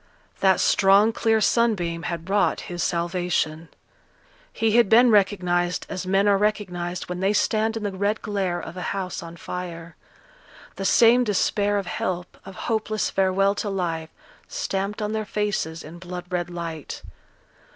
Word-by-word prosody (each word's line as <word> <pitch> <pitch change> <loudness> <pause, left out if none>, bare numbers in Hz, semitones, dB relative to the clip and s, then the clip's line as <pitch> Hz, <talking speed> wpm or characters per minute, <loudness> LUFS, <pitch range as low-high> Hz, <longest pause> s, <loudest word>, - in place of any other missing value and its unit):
That 190 -1 +4
strong 200 +3 +4
clear 225 -1 +2
sunbeam 200 -7 +1
had 170 0 -5
wrought 200 +1 +1
his 175 -1 -5
salvation. 170 -2 -1 0.8
He 225 -1 0
had 235 -2 +4
been 240 +2 +6
recognized 180 -3 +2
as 185 0 -5
men 195 +2 +3
are 200 -1 +4
recognized 180 -4 -2
when 180 0 -4
they 195 +2 +2
stand 220 +1 +1
in 220 - -5
the 205 - -1
red 200 +3 -1
glare 195 -4 -1
of 160 - -8
a 180 - -6 0.2
house 185 -2 -4
on 170 0 -10
fire; 170 -2 -7 0.8
the 195 - -4
same 240 +4 +5
despair 205 -1 +1
of 200 - -2
help, 180 0 -3
of 195 - -10
hopeless 215 -1 -1
farewell 195 +1 +2
to 205 0 -3
life, 165 -4 -2 0.4
stamped 205 - -3
on 210 - -2
their 220 0 -1
faces 205 -7 -2
in 165 +3 -10
blood 180 0 -7
red 175 -1 -1
light. 165 -4 -6
190 Hz, 155 wpm, -24 LUFS, 175-210 Hz, 0.8 s, been